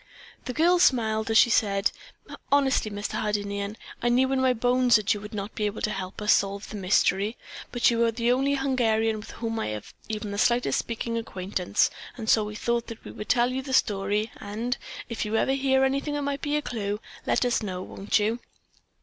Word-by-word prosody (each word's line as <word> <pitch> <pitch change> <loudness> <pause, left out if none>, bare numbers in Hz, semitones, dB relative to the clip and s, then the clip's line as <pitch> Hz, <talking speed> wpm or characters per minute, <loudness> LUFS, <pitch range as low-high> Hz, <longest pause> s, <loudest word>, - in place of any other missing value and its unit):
The 250 - -3
girl 345 +5 +4
smiled 220 -8 +2
as 225 - +4
she 235 - +6
said: 200 -3 +2 0.6
"Honestly, 275 -5 +3
Mr. 205 0 -4
Hardinian, 205 0 -2 0.2
I 240 - +2
knew 260 +2 +3
in 265 -1 +1
my 260 -1 +4
bones 245 +1 +3
that 215 -3 +3
you 205 - -6
would 210 +1 -8
not 200 +1 -4
be 210 - -1
able 205 - -5
to 215 - +1
help 190 +1 -5
us 210 - +5
solve 200 +1 0
the - - -6
mystery, 195 +2 +1 0.3
but 240 0 +3
you 230 - 0
were 235 0 +4
the 235 +1 +1
only 270 +3 +2
Hungarian 225 -5 +1
with 210 - -9
whom 225 -1 -4
I - - -2
had 105 -1 -4 0.3
even 210 -1 -4
the 200 - -3
slightest 240 +2 +2
speaking 230 0 -3
acquaintance, 190 -2 -1 0.3
and 225 -3 -6
so 220 -1 +4
we 210 0 -6
thought 235 +2 -1
that 230 - -9
we - - -7
would 210 - -8
tell 240 +1 +3
you 265 - -2
the 265 0 -6
story 205 -1 +1
and, 225 +5 -3 0.3
if 230 - -3
you 215 0 -2
ever 265 - +2
hear 265 -1 +2
anything 275 +2 0
that 290 - -2
might 280 0 -2
be 290 0 -1
a 300 - 0
clue, 210 -5 -3 0.3
let - - +2
us 245 -1 +1
know, 185 -3 -4
won't 195 +2 -1
you?" 220 +3 0
225 Hz, 215 wpm, -26 LUFS, 210-250 Hz, 0.6 s, she